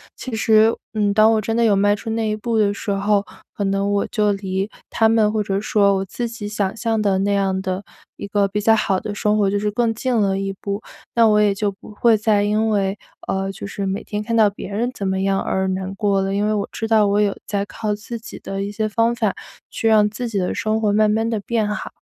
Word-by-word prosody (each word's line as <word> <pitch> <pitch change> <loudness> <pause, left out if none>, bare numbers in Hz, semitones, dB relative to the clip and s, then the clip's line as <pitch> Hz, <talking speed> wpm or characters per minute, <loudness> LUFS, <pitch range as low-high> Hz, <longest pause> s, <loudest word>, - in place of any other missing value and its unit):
其 255 - -7
实， 220 0 +4 0.2
嗯， 205 -2 +1
当 215 +1 +5
我 220 - +1
真 225 +2 -2
的 235 - +3
有 210 -3 +4
迈 205 +1 +3
出 225 +2 -5
那 225 -1 -1
一 215 - -1
步 230 +1 -1
的 205 -1 +3
时 205 - -6
候， 200 +1 +1 0.3
可 205 - -2
能 195 +1 0
我 200 0 0
就 210 -1 +1
离 195 0 -2 0.2
他 225 -1 +3
们 220 -2 +3
或 215 -1 0
者 195 0 -1
说 200 -1 +2
我 190 - -2
自 235 +5 -4
己 225 -3 -6
想 205 -2 -1
象 225 -1 0
的 200 -2 +2
那 200 +1 +1
样 190 -1 0
的 190 +1 -3 0.3
一 - - -7
个 200 0 +1
比 210 +1 -2
较 225 +2 +5
好 195 -3 +1
的 205 - -4
生 210 +1 +1
活， 200 -2 +2
就 205 - 0
是 210 0 0
更 230 +1 0
近 250 +2 -1
了 195 -3 +1
一 195 0 -3
步。 200 +1 -3 0.3
那 230 -1 +6
我 210 -1 +4
也 205 -1 +3
就 205 +1 -1
不 195 +2 -12
会 225 +2 +3
再 210 -1 +2
因 215 +2 +1
为 200 -1 0 0.6
就 195 - -7
是， 200 - -7
呃， 195 - -1
每 190 +1 -3
天 210 0 -3
看 230 +1 -3
到 215 -2 +5
别 200 -1 -8
人 225 +5 -1
怎 200 - -5
么 190 0 0
样 195 0 +1
而 190 0 -1
难 190 +1 -3
过 200 -1 +1
了。 195 0 -1
因 205 +1 +1
为 215 - +1
我 205 -1 -1
知 225 - -4
道 215 -2 +4
我 200 +1 +2
有 205 -1 +1
在 200 -1 -2
靠 210 0 -3
自 220 +3 -6
己 230 +1 -10
的 195 0 -4
一 200 - -4
些 215 +1 -1
方 230 +2 +1
法， 225 -4 -1 0.3
去 225 - -2
让 210 -1 +5
自 240 +4 -5
己 210 - -3
的 180 - -1
生 220 0 0
活 210 - +2
慢 215 0 +4
慢 225 +2 +1
地 225 -2 -1
变 220 +1 -1
好。 210 - -4
210 Hz, 280 characters per minute, -21 LUFS, 200-220 Hz, 0.6 s, 那